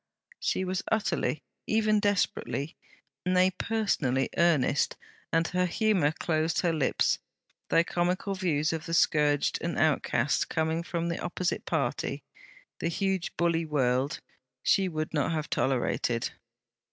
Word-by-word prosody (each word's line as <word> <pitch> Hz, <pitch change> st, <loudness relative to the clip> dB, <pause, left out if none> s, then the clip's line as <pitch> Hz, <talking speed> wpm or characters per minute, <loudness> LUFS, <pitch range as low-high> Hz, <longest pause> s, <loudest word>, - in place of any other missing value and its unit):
She -, -, 0 dB
was 185 Hz, 0 st, -1 dB
utterly, 215 Hz, -7 st, 0 dB, 0.2 s
even 215 Hz, -1 st, +3 dB
desperately, 195 Hz, -7 st, -1 dB, 0.5 s
nay 185 Hz, +1 st, +3 dB
personally, 170 Hz, -, 0 dB
earnest, 155 Hz, -5 st, +2 dB, 0.3 s
and 165 Hz, 0 st, +2 dB
her 180 Hz, 0 st, +1 dB
humour 185 Hz, -5 st, +2 dB
closed 160 Hz, 0 st, 0 dB
her 170 Hz, -2 st, +1 dB
lips; 150 Hz, -5 st, +1 dB, 0.5 s
though 165 Hz, -, +4 dB
comical 180 Hz, +3 st, -1 dB
views 165 Hz, -5 st, 0 dB
of 160 Hz, 0 st, -4 dB
the 165 Hz, -, 0 dB
scourged 150 Hz, -3 st, +3 dB
and 170 Hz, 0 st, -2 dB
outcast 140 Hz, -3 st, +1 dB
coming 160 Hz, +1 st, 0 dB
from 170 Hz, 0 st, -3 dB
the 170 Hz, -, -2 dB
opposite 175 Hz, 0 st, -2 dB
party -, -, -1 dB, 0.6 s
the -, -, -1 dB
huge 190 Hz, +1 st, -1 dB
bully 170 Hz, -1 st, +2 dB
world 135 Hz, -3 st, 0 dB, 0.4 s
she 190 Hz, -1 st, +3 dB
would 155 Hz, -1 st, -3 dB
not 150 Hz, +2 st, +1 dB
have 155 Hz, -1 st, -3 dB
tolerated. 120 Hz, -2 st, 0 dB
165 Hz, 130 wpm, -28 LUFS, 150-185 Hz, 0.6 s, though